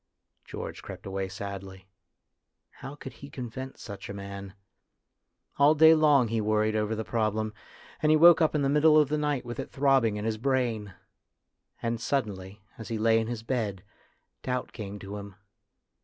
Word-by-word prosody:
George -, -, -7 dB
crept -, -, -10 dB
away 95 Hz, 0 st, -3 dB
sadly. 95 Hz, -1 st, -7 dB, 0.9 s
How 135 Hz, -, -9 dB
could 135 Hz, -3 st, -9 dB
he 140 Hz, +1 st, -11 dB
convince 130 Hz, 0 st, -7 dB
such 100 Hz, -2 st, -8 dB
a 100 Hz, -, -5 dB
man? 100 Hz, 0 st, -8 dB, 1.0 s
All 145 Hz, +2 st, +6 dB
day 160 Hz, +1 st, +8 dB
long 145 Hz, -6 st, +4 dB
he 115 Hz, 0 st, 0 dB
worried 110 Hz, 0 st, +1 dB
over 105 Hz, +1 st, 0 dB
the 110 Hz, 0 st, -4 dB
problem, 110 Hz, -1 st, -1 dB, 0.5 s
and 155 Hz, -, +2 dB
he 155 Hz, -, +6 dB
woke 170 Hz, +2 st, +7 dB
up 160 Hz, -1 st, +2 dB
in 145 Hz, -, +1 dB
the -, -, +2 dB
middle 150 Hz, +2 st, +5 dB
of 150 Hz, -3 st, +3 dB
the 150 Hz, -, 0 dB
night 145 Hz, -4 st, -1 dB
with 120 Hz, +2 st, -6 dB
it 135 Hz, -, -5 dB
throbbing 135 Hz, -6 st, +2 dB
in 105 Hz, -, -4 dB
his 110 Hz, -1 st, -1 dB
brain. 115 Hz, -7 st, -1 dB, 0.9 s
And 115 Hz, -1 st, -1 dB
suddenly, 105 Hz, -6 st, -3 dB, 0.2 s
as 110 Hz, -, -7 dB
he 115 Hz, -, -3 dB
lay 115 Hz, +1 st, +3 dB
in 110 Hz, -, -2 dB
his 115 Hz, -2 st, -5 dB
bed, 110 Hz, -7 st, -2 dB, 0.6 s
doubt 125 Hz, -1 st, -3 dB
came 105 Hz, -2 st, -7 dB
to 100 Hz, +1 st, -7 dB
him. 100 Hz, -1 st, -9 dB
115 Hz, 175 wpm, -28 LUFS, 105-135 Hz, 1.0 s, day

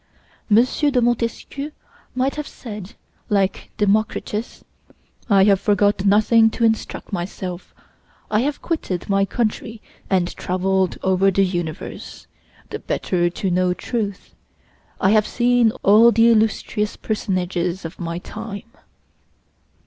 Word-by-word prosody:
M. 220 Hz, +3 st, +6 dB
de 280 Hz, 0 st, +1 dB
Montesquieu 240 Hz, +4 st, -2 dB, 0.4 s
might 260 Hz, +2 st, +1 dB
have 300 Hz, -1 st, -5 dB
said, 210 Hz, -3 st, -9 dB, 0.3 s
like 200 Hz, -2 st, 0 dB
Democritus, 210 Hz, +2 st, -1 dB, 0.7 s
"I 195 Hz, -2 st, +5 dB
have 195 Hz, -1 st, +4 dB
forgot 205 Hz, -1 st, +2 dB
nothing 220 Hz, +3 st, +5 dB
to 230 Hz, -, -3 dB
instruct 225 Hz, -2 st, -1 dB
myself; 180 Hz, 0 st, -5 dB, 0.6 s
I 215 Hz, -, +3 dB
have 280 Hz, +4 st, -2 dB
quitted 200 Hz, -, -3 dB
my 195 Hz, 0 st, +3 dB
country 220 Hz, +1 st, -2 dB, 0.3 s
and 180 Hz, -2 st, 0 dB
traveled 185 Hz, 0 st, 0 dB
over 190 Hz, +1 st, +3 dB
the 195 Hz, +1 st, +2 dB
universe, 175 Hz, -4 st, -5 dB, 0.5 s
the -, -, -4 dB
better 175 Hz, -2 st, -1 dB
to 185 Hz, +2 st, -3 dB
know 180 Hz, 0 st, +1 dB
truth; 205 Hz, -4 st, -4 dB, 0.7 s
I 190 Hz, -, +3 dB
have 215 Hz, -1 st, +3 dB
seen 245 Hz, -1 st, +3 dB
all 220 Hz, +4 st, +7 dB
the 230 Hz, +2 st, +5 dB
illustrious 215 Hz, -1 st, 0 dB
personages 185 Hz, -4 st, -2 dB
of 165 Hz, -, -8 dB
my 170 Hz, -1 st, -4 dB
time." 205 Hz, +2 st, -7 dB
205 Hz, 120 wpm, -21 LUFS, 185-225 Hz, 0.7 s, all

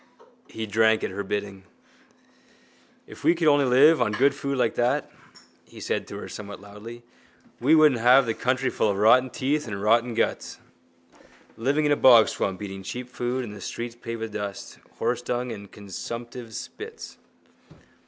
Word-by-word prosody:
He 110 Hz, -, -6 dB
drank 110 Hz, +1 st, +2 dB
at -, -, -2 dB
her 100 Hz, +2 st, -4 dB
bidding. 100 Hz, -1 st, -4 dB, 1.4 s
—If -, -, -13 dB
we 170 Hz, -, +4 dB
could 165 Hz, -2 st, 0 dB
live 145 Hz, +1 st, +5 dB
on 105 Hz, -3 st, +1 dB
good 135 Hz, +6 st, +3 dB
food 140 Hz, -1 st, -3 dB
like 120 Hz, -3 st, +1 dB
that, 120 Hz, +1 st, 0 dB, 0.5 s
he -, -, -15 dB
said -, -, -3 dB
to -, -, -8 dB
her -, -, -7 dB
somewhat 100 Hz, -1 st, -8 dB
loudly, 105 Hz, +4 st, -11 dB, 0.6 s
we 145 Hz, +7 st, +4 dB
wouldn't 150 Hz, -7 st, +5 dB
have 125 Hz, +3 st, +6 dB
the 115 Hz, -, -1 dB
country 125 Hz, +3 st, -1 dB
full -, -, 0 dB
of 100 Hz, -, -1 dB
rotten 125 Hz, +5 st, +5 dB
teeth 145 Hz, +3 st, -1 dB
and 100 Hz, -2 st, -5 dB
rotten 115 Hz, +3 st, +2 dB
guts. -, -, -1 dB, 1.0 s
Living 140 Hz, +7 st, 0 dB
in 145 Hz, -, +2 dB
a -, -, +5 dB
bogswamp, 110 Hz, -6 st, +4 dB
eating 95 Hz, -1 st, -7 dB
cheap 125 Hz, +6 st, -7 dB
food 125 Hz, +1 st, -3 dB
and 105 Hz, -2 st, -9 dB
the -, -, -11 dB
streets 120 Hz, 0 st, -5 dB
paved 115 Hz, -1 st, -7 dB
with 115 Hz, -1 st, -5 dB
dust, 100 Hz, -2 st, -6 dB, 0.2 s
horsedung 125 Hz, 0 st, -2 dB
and 100 Hz, -2 st, -11 dB
consumptives' 115 Hz, +3 st, -8 dB
spits. 450 Hz, +1 st, -9 dB
120 Hz, 165 wpm, -25 LUFS, 105-130 Hz, 1.4 s, have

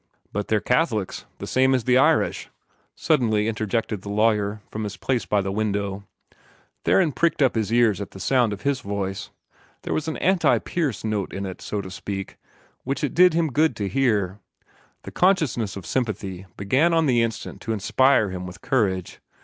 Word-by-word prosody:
"But 105 Hz, 0 st, -2 dB
they're 110 Hz, -, +2 dB
Catholics, 120 Hz, -, 0 dB
the -, -, -6 dB
same 130 Hz, +1 st, +3 dB
as 125 Hz, -, 0 dB
the 125 Hz, +1 st, +3 dB
Irish," 130 Hz, -, +2 dB, 0.5 s
suddenly 110 Hz, -8 st, +1 dB
interjected 110 Hz, -1 st, -2 dB
the 100 Hz, -, -8 dB
lawyer, 105 Hz, -1 st, +1 dB
from 110 Hz, -, -4 dB
his 100 Hz, -2 st, -5 dB
place 125 Hz, +4 st, -1 dB
by 105 Hz, -1 st, +2 dB
the 95 Hz, 0 st, -3 dB
window. 100 Hz, -1 st, -2 dB, 0.8 s
Theron 175 Hz, -5 st, +3 dB
pricked 170 Hz, +3 st, +1 dB
up 130 Hz, -, +3 dB
his 110 Hz, -2 st, -1 dB
ears 115 Hz, -4 st, +3 dB
at 100 Hz, -, -5 dB
the 95 Hz, -, -12 dB
sound 125 Hz, 0 st, +2 dB
of 105 Hz, -, -6 dB
his 140 Hz, -2 st, 0 dB
voice. 100 Hz, -3 st, -4 dB, 0.5 s
There -, -, -2 dB
was 155 Hz, -, -2 dB
an 160 Hz, -, -3 dB
anti 190 Hz, -1 st, +3 dB
Pierce 150 Hz, -, -2 dB
note 105 Hz, -3 st, -2 dB
in 100 Hz, +1 st, -4 dB
it, 95 Hz, -1 st, -7 dB
so 105 Hz, -, -3 dB
to 95 Hz, -, -9 dB
speak, 95 Hz, +1 st, -6 dB, 0.5 s
which 135 Hz, +3 st, -3 dB
it 145 Hz, -, -1 dB
did 180 Hz, -1 st, +5 dB
him 165 Hz, -3 st, +1 dB
good 155 Hz, -1 st, +2 dB
to 105 Hz, -2 st, -2 dB
hear. 105 Hz, -6 st, 0 dB, 0.6 s
The -, -, -8 dB
consciousness 155 Hz, -, +1 dB
of 95 Hz, -4 st, -8 dB
sympathy 100 Hz, -5 st, -3 dB
began 135 Hz, -, +2 dB
on 165 Hz, -1 st, +3 dB
the 125 Hz, -4 st, +3 dB
instant 115 Hz, -1 st, -4 dB
to 115 Hz, -, -4 dB
inspire 110 Hz, +1 st, +3 dB
him 90 Hz, 0 st, -5 dB
with 90 Hz, +2 st, -11 dB
courage. 95 Hz, -8 st, -1 dB
110 Hz, 185 wpm, -24 LUFS, 100-130 Hz, 0.8 s, did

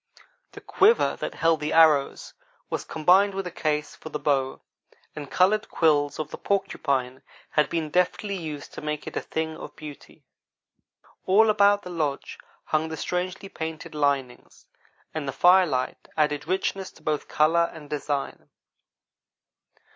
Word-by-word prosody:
The -, -, -10 dB
quiver 445 Hz, +4 st, +3 dB
that -, -, -5 dB
held 165 Hz, -1 st, +2 dB
the 150 Hz, -, -2 dB
arrows 155 Hz, -4 st, +4 dB, 0.4 s
was -, -, -2 dB
combined 190 Hz, +5 st, +3 dB
with 195 Hz, -1 st, -3 dB
a 180 Hz, -, -5 dB
case 150 Hz, -2 st, -2 dB
for 160 Hz, -, -10 dB
the 150 Hz, -, -3 dB
bow, 135 Hz, -3 st, 0 dB, 0.5 s
and 145 Hz, -2 st, -7 dB
colored 210 Hz, +4 st, +2 dB
quills 145 Hz, -3 st, +2 dB
of 155 Hz, -1 st, -5 dB
the -, -, -7 dB
porcupine 140 Hz, -10 st, -1 dB, 0.3 s
had 150 Hz, -, +2 dB
been 160 Hz, -2 st, -2 dB
deftly 180 Hz, +3 st, 0 dB
used 155 Hz, -5 st, -7 dB
to -, -, -7 dB
make 150 Hz, 0 st, -4 dB
it -, -, -7 dB
a -, -, -1 dB
thing 160 Hz, 0 st, -3 dB
of -, -, -10 dB
beauty. 150 Hz, -2 st, -12 dB, 1.0 s
All 215 Hz, +4 st, +5 dB
about 205 Hz, -1 st, +4 dB
the 180 Hz, -, -8 dB
lodge 150 Hz, -5 st, -3 dB, 0.2 s
hung 155 Hz, +1 st, -1 dB
the 160 Hz, -, -5 dB
strangely 185 Hz, +4 st, -3 dB
painted 160 Hz, -4 st, -6 dB
linings, 140 Hz, -4 st, -2 dB, 0.5 s
and 155 Hz, -3 st, -4 dB
the -, -, -1 dB
firelight 175 Hz, -3 st, +3 dB
added 150 Hz, -1 st, 0 dB
richness 190 Hz, +1 st, -1 dB
to -, -, -20 dB
both 150 Hz, -1 st, -1 dB
color 165 Hz, +2 st, +3 dB
and 155 Hz, -3 st, -11 dB
design. 145 Hz, -1 st, -4 dB
155 Hz, 150 wpm, -25 LUFS, 150-180 Hz, 1.0 s, All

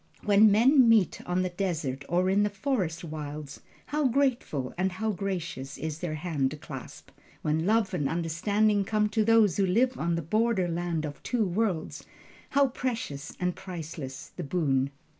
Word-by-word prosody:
When 210 Hz, +1 st, +6 dB
men 245 Hz, +4 st, +6 dB
meet 215 Hz, -6 st, +3 dB
on 180 Hz, +1 st, +1 dB
the 185 Hz, -, -1 dB
desert 160 Hz, -8 st, -2 dB
or 180 Hz, +2 st, +2 dB
in 195 Hz, +2 st, +3 dB
the 205 Hz, -, +2 dB
forest 195 Hz, -, -2 dB
wilds, 150 Hz, -2 st, -6 dB, 0.3 s
how 300 Hz, -1 st, +1 dB
grateful 240 Hz, -, 0 dB
and 185 Hz, +1 st, 0 dB
how 220 Hz, +4 st, -1 dB
gracious 170 Hz, -9 st, -4 dB
is 155 Hz, 0 st, -4 dB
their 160 Hz, -3 st, -3 dB
hand 150 Hz, -3 st, -2 dB
clasp! -, -, -9 dB, 0.3 s
When 160 Hz, +3 st, 0 dB
love 215 Hz, -2 st, +2 dB
and 145 Hz, -6 st, 0 dB
understanding 200 Hz, +6 st, +1 dB
come 210 Hz, +1 st, +1 dB
to 215 Hz, +1 st, +1 dB
those 220 Hz, -4 st, +4 dB
who 200 Hz, -, +3 dB
live 245 Hz, +7 st, +2 dB
on 170 Hz, +1 st, 0 dB
the 170 Hz, -, -2 dB
border 215 Hz, +2 st, +1 dB
land 170 Hz, -2 st, -2 dB
of 145 Hz, -1 st, -7 dB
two 240 Hz, -4 st, 0 dB
worlds, 185 Hz, -3 st, -1 dB, 0.5 s
how 280 Hz, -1 st, +3 dB
precious 225 Hz, -, -4 dB
and 180 Hz, -1 st, -1 dB
priceless 160 Hz, -7 st, -7 dB
the 180 Hz, -, -5 dB
boon! 140 Hz, -4 st, +1 dB
180 Hz, 165 wpm, -28 LUFS, 155-215 Hz, 0.5 s, When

